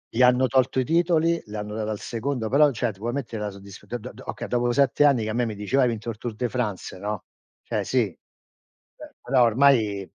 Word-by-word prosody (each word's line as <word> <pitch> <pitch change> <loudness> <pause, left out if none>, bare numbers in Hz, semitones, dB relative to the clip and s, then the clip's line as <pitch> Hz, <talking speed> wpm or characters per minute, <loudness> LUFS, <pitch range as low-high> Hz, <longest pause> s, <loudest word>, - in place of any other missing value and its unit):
Gli 125 +3 +3
hanno 125 +1 +5
tolto 130 +1 +2
i - - 0
titoli, 170 +2 +2
li 105 -1 -9
hanno 105 0 -5
dati 110 0 -3
al 105 -1 -3
secondo, 120 -1 -3
però 145 +4 +5
cioè, 115 -2 -1
ti 95 - -18
vuoi 120 +3 -3
mettere 120 -6 -4
la 105 - -2
soddisf 100 0 -12
do 120 - -4
do 120 +2 -9
do - - -13
okay, - - -5
dopo 120 0 +1
7 140 +2 +3
anni 135 -6 +4
che 110 - -3
a - - -2
me 120 +1 +1
mi 110 -2 -4
diceva: 105 +7 +1
"Hai - - +4
vinto 115 -1 -3
il 110 - -5
Tour 115 0 -5
de 120 +2 -2
France," 105 -8 -3
no, 105 0 -4 0.4
cioè - - -2
sì, - - +1 0.9
beh - - -13
però 125 -1 +3
ormai 115 -4 +3
120 Hz, 245 wpm, -25 LUFS, 105-130 Hz, 0.9 s, hanno